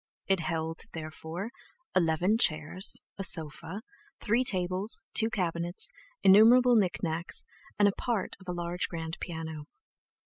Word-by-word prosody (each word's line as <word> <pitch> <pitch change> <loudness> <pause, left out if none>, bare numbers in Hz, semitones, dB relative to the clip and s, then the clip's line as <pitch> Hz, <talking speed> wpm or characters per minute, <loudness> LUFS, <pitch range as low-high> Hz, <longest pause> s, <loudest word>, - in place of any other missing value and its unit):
It 195 -1 +2
held, 160 0 -3
therefore, 160 +5 -6 0.4
eleven 180 +5 +2
chairs, 160 +2 +1 0.2
a - - -2
sofa, 165 +3 +3 0.4
three 235 +4 +1
tables, 185 -1 -2
two 225 0 +2
cabinets, 175 -3 -1 0.3
innumerable 240 +5 +7
knicknacks, 175 -5 0 0.3
and 205 -1 +3
part 230 -6 -2
of 190 - -16
a - - -2
large 175 +1 -2
grand 165 -1 -5
piano. 160 -3 -6
175 Hz, 115 wpm, -29 LUFS, 160-205 Hz, 0.4 s, innumerable